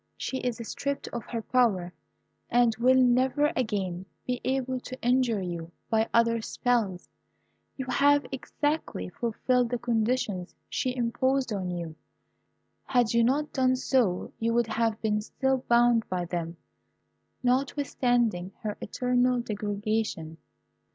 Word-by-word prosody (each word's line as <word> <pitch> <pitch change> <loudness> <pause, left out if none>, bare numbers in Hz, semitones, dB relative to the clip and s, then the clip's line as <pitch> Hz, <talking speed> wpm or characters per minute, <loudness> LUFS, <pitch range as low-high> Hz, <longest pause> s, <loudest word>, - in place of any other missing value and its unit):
She 265 - -3
is 245 -2 -2
stripped 280 0 -3
of 235 -2 -5
her 230 -2 -4
power, 200 -9 +2 0.6
and 240 -2 +3
will 255 +3 +5
never 260 +4 +3
again 190 -7 -2 0.2
be 250 -1 -2
able 260 -1 -1
to 255 +1 -8
injure 245 -4 +2
you 170 -2 -5 0.2
by 220 0 +2
other 230 0 +3
spells. 220 -7 -1 0.7
You 265 - -3
have 285 +3 +4
exactly 280 - -2
fulfilled 240 - 0
the 245 - -1
conditions 230 -5 -1
she 255 -1 -1
imposed 255 +1 0
on 190 -3 -2
you. 170 -2 -4 0.9
Had 245 -3 +2
you 235 0 +4
not 285 +5 +1
done 255 -1 +3
so, 250 -8 +1
you 230 +1 +1
would 240 0 +3
have 225 0 0
been 210 -1 +1
still 265 +4 0
bound 235 -1 +4
by 180 -1 -1
them, 170 -1 -4 0.9
notwithstanding 245 -7 +1
her 210 -1 -3
eternal 250 +2 +1
degradation. 205 -6 -2
235 Hz, 130 wpm, -28 LUFS, 210-255 Hz, 0.9 s, will